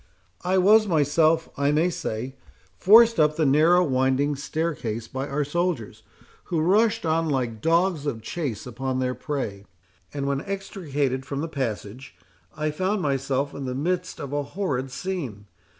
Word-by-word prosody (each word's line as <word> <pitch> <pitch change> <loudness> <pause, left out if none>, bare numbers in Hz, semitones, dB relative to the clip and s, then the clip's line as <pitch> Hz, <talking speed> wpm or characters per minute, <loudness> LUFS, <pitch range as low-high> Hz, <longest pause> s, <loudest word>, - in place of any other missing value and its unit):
I 185 +1 +1
was 210 +4 +5
myself, 160 0 +2
I 140 0 +2
may 160 +4 +2
say, 135 -6 -4 0.4
forced 225 +1 +6
up 150 0 +4
the 160 -1 +1
narrow 160 +6 +5
winding 135 0 +1
staircase 135 -7 -3
by 130 +4 -4
our 145 +1 -1
soldiers, 170 - -2 0.4
who 170 - -1
rushed 210 +5 +2
on 160 0 +1
like 120 -6 -2
dogs 165 -1 +1
of 115 -6 -3
chase 130 -5 -4
upon 130 +2 -3
their 130 -1 0
prey; 120 -9 -4 0.5
and 140 -1 -3
when 140 0 -1
extricated 150 - -3
from 140 +1 -4
the 165 - -2
passage, 125 - -5 0.4
I 155 0 -1
found 190 +5 -1
myself 140 0 -1
in 140 - -6
the 125 -1 -3
midst 180 +6 -2
of 140 0 -6
a 145 - 0
horrid 140 -4 -3
scene. 130 - -5
145 Hz, 155 wpm, -25 LUFS, 130-175 Hz, 0.5 s, forced